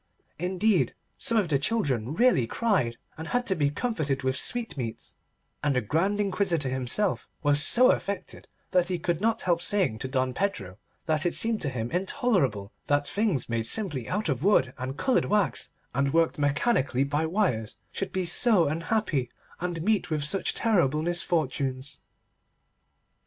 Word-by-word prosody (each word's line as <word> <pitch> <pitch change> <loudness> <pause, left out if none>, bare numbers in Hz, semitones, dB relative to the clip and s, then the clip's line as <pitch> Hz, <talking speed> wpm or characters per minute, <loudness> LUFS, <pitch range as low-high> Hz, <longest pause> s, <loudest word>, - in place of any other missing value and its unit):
Indeed 185 +3 +1 0.2
some 230 - +1
of 205 -5 +2
the 140 -3 +2
children 140 - -1
really 230 - +3
cried, 155 - 0 0.2
and 160 - -6
had 245 +6 0
to 190 - +1
be 145 -4 +1
comforted 145 - -2
with 130 0 0
sweetmeats, 140 - -1 0.5
and 145 -2 +1
the 125 - +2
Grand 170 - 0
Inquisitor 190 -8 0
himself 130 - 0 0.2
was 145 0 +3
so 250 +10 +5
affected 200 0 -4 0.2
that 180 -1 +3
he 180 -1 -1
could 170 +1 -2
not 225 +1 +1
help 175 -2 +1
saying 180 - +1
to 130 - -3
Don 130 -1 -1
Pedro 105 - -3 0.3
that 155 -3 0
it 175 - 0
seemed 225 -1 +1
to 145 - 0
him 120 -3 -4
intolerable 175 - 0 0.2
that 145 0 +2
things 200 - 0
made 115 -1 -1
simply 150 - -2
out 205 +2 -1
of 140 -2 -1
wood 135 -11 +3
and 130 +2 -5
coloured 260 - +1
wax, 200 - 0 0.2
and 140 +2 +1
worked 165 -2 +2
mechanically 145 - +1
by 145 +3 -1
wires, 160 - -1
should 195 - -4
be 185 -1 -1
so 190 +1 +4
unhappy 160 - -1 0.3
and 175 -2 -3
meet 210 -2 +1
with 155 -2 -1
such 170 +7 +1
terrible 165 - +2
misfortunes. 145 -6 -1
160 Hz, 160 wpm, -27 LUFS, 135-200 Hz, 0.5 s, so